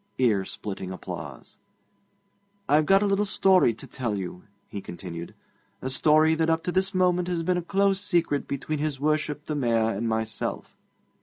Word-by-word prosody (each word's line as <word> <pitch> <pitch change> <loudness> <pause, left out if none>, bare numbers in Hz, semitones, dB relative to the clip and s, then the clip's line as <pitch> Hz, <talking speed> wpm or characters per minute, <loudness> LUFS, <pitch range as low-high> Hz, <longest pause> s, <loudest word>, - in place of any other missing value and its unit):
Ear 110 -7 +2
splitting 95 -2 -6
applause. 95 - -8 1.1
'I've 150 +1 +3
got 195 +1 +5
a - - +2
little 200 0 +2
story 190 - +4
to - - -10
tell 120 -5 -3
you,' 90 -1 -6 0.2
he 100 - -6
continued 85 -2 -8 0.4
'a 130 - -4
story 155 +4 +4
that 160 0 +1
up 165 0 +1
to 180 - -1
this 190 +2 0
moment 180 -1 +2
has 175 -2 -1
been 180 +2 +1
a - - 0
close 195 +2 +1
secret 170 -7 0
between 145 +2 -3
his 150 -3 -2
Worship 150 0 0
the 155 - -3
Mayor 115 -5 +1
and 115 +4 -2
myself.' 110 -2 -3
150 Hz, 170 wpm, -26 LUFS, 115-180 Hz, 1.1 s, got